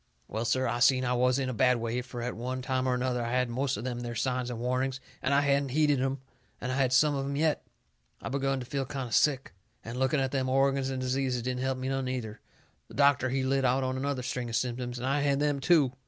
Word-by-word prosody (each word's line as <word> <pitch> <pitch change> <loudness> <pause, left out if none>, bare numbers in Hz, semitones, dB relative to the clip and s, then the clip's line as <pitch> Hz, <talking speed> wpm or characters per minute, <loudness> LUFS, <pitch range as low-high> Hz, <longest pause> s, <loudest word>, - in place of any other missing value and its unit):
Well, 110 +3 -3
sir, 130 +3 +1
I 120 - -1
seen 130 0 +4
I 125 - +1
was 125 +1 +3
in 135 -2 -1
a 130 - -2
bad 125 +1 +3
way, 115 +1 -2
fur 125 -1 -7
at 125 - -3
one 130 +2 -4
time 130 0 0
or 125 - +2
another 125 -1 -1
I 115 - -2
had 125 - +1
had 125 -1 +1
most 135 +1 -1
of 105 - -6
them 125 -1 -3
there 120 -1 -5
signs 125 +1 -1
and 120 - -4
warnings, 130 +2 -1 0.2
and 130 - 0
hadn't 140 0 +3
heeded 145 -1 +2
'em, 135 +1 0 0.4
and 125 - -3
I - - -1
had 130 -2 +2
some 145 +3 +4
of 135 -1 -1
'em 140 +1 -3
yet. 155 +1 +1 0.6
I - - -5
begun 135 0 0
to 125 - -6
feel 135 0 -3
kind 135 -3 -4
o' - - -14
sick, 135 -2 +2 0.3
and 115 +2 -5
looking 130 +3 +2
at 135 -1 0
them 130 -2 0
organs 135 0 +2
and 130 -1 -3
diseases 130 -1 -1
didn't 125 0 -2
help 130 0 0
me 130 0 -4
none, 135 -1 -1
either. 115 -4 -4 0.5
The - - -13
doctor, 140 -2 +4
he 130 +1 0
lit 135 +1 +1
out 130 +1 +2
on 130 0 -1
another 135 -1 -2
string 125 0 -3
of 115 - -3
symptoms, 125 0 -2
and 120 - -4
I 140 +2 +1
had 140 -1 +2
them, 145 -1 +1
too. 140 -3 +3
130 Hz, 265 wpm, -29 LUFS, 125-135 Hz, 0.6 s, seen